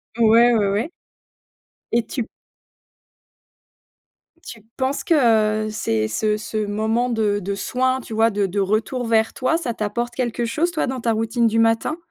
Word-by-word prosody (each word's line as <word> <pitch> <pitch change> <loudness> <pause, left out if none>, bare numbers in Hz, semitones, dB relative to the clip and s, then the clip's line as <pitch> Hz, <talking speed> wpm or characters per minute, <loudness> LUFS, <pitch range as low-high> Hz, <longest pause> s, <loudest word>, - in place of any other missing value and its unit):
Ouais, 235 +1 +5
ouais, 205 -3 +2
ouais. 210 +10 -1 1.0
Et 235 -1 +1
tu 240 -2 -4 2.2
tu 225 - -9 0.2
penses 265 +1 -1
que, - - +2 0.5
heu, - - -4
c'est 110 - -1
ce 210 - 0
ce 215 0 -3
moment 220 +4 0
de 215 -3 0
de 200 +1 -3
soin, 255 +5 0
tu 230 - -9
vois 225 +1 +3
de 205 -1 0
de 195 +2 -2
retour 215 +5 -1
vers 225 -1 +2
toi, 290 +6 0
ça 255 -9 -3
t'apporte 235 +3 -3
quelque 240 -2 -2
chose 320 +9 0
toi, 320 -5 -1
dans 260 -1 -4
ta 230 0 +1
routine 225 +1 +1
du 225 +1 +1
matin? 225 +7 +1
225 Hz, 165 wpm, -21 LUFS, 215-245 Hz, 2.2 s, Ouais